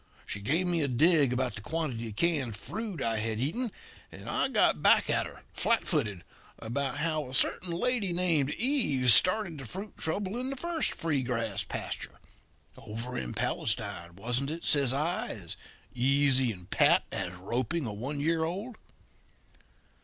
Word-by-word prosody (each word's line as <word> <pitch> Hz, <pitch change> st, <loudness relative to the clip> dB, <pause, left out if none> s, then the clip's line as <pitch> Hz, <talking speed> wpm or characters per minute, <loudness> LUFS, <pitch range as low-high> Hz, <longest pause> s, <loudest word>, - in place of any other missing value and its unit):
She 100 Hz, -, -4 dB
gave 155 Hz, -, 0 dB
me 175 Hz, -2 st, +1 dB
a 145 Hz, -, +1 dB
dig 145 Hz, +1 st, +4 dB
about 125 Hz, 0 st, -1 dB
the 110 Hz, -, -7 dB
quantity 130 Hz, -5 st, -3 dB
of 105 Hz, -, -8 dB
canned 145 Hz, -7 st, +1 dB
fruit 205 Hz, -, -5 dB
I 115 Hz, -1 st, 0 dB
had 110 Hz, 0 st, -2 dB
eaten, 210 Hz, -, -2 dB, 0.4 s
and -, -, -11 dB
I -, -, +1 dB
got -, -, +3 dB
back -, -, +5 dB
at -, -, +1 dB
her, -, -, -14 dB
flat 230 Hz, -1 st, +3 dB
footed, 105 Hz, -, -1 dB, 0.3 s
about 135 Hz, +5 st, -2 dB
how 155 Hz, -3 st, -2 dB
a 130 Hz, -, -4 dB
certain 175 Hz, +6 st, +2 dB
lady 205 Hz, +2 st, 0 dB
named 170 Hz, -6 st, +1 dB
Eve 185 Hz, -, +3 dB
started 175 Hz, -, +4 dB
the 135 Hz, -, -8 dB
fruit 195 Hz, -, -7 dB
trouble 195 Hz, +7 st, -2 dB
in 255 Hz, +1 st, -3 dB
the 275 Hz, -, -4 dB
first 335 Hz, +3 st, -2 dB
free 155 Hz, -5 st, -1 dB
grass 115 Hz, -5 st, -2 dB
pasture -, -, -6 dB, 0.6 s
'Over 115 Hz, +4 st, -7 dB
in -, -, -4 dB
Palestine, 85 Hz, 0 st, -2 dB
wasn't 120 Hz, +7 st, -1 dB
it?' 165 Hz, +2 st, -5 dB
says 140 Hz, -4 st, +4 dB
I, 155 Hz, +7 st, -1 dB
as 95 Hz, -7 st, -7 dB, 0.4 s
easy 135 Hz, 0 st, +4 dB
and 90 Hz, -4 st, -11 dB
pat -, -, +4 dB
as 90 Hz, -2 st, -3 dB
roping 120 Hz, -, -2 dB
a 110 Hz, -, -4 dB
one 135 Hz, +8 st, -4 dB
year 160 Hz, +2 st, +1 dB
old. 200 Hz, +8 st, -4 dB
140 Hz, 170 wpm, -29 LUFS, 115-175 Hz, 0.6 s, back